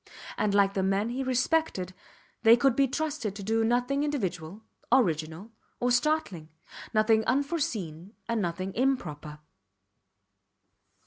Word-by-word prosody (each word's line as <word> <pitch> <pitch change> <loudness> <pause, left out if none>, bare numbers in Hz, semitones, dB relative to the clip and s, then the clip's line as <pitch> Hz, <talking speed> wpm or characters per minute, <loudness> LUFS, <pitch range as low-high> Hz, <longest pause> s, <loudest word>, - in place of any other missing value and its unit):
And 205 -1 0
like 200 -1 +4
the 195 - 0
men 195 +3 0
he 250 +3 -3
respected 255 - 0 0.5
they 230 0 +7
could 255 0 +2
be 275 0 +3
trusted 285 -7 -3
to 200 - -7
do 225 +3 +1
nothing 245 +5 +1
individual, 195 - -3 0.3
original, 165 - +1 0.3
or 245 0 +1
startling 245 - 0 0.4
nothing 220 0 +3
unforeseen 245 - -2
and 230 -2 0
nothing 185 +1 -3
improper. 160 - -2
225 Hz, 120 wpm, -28 LUFS, 185-260 Hz, 0.5 s, they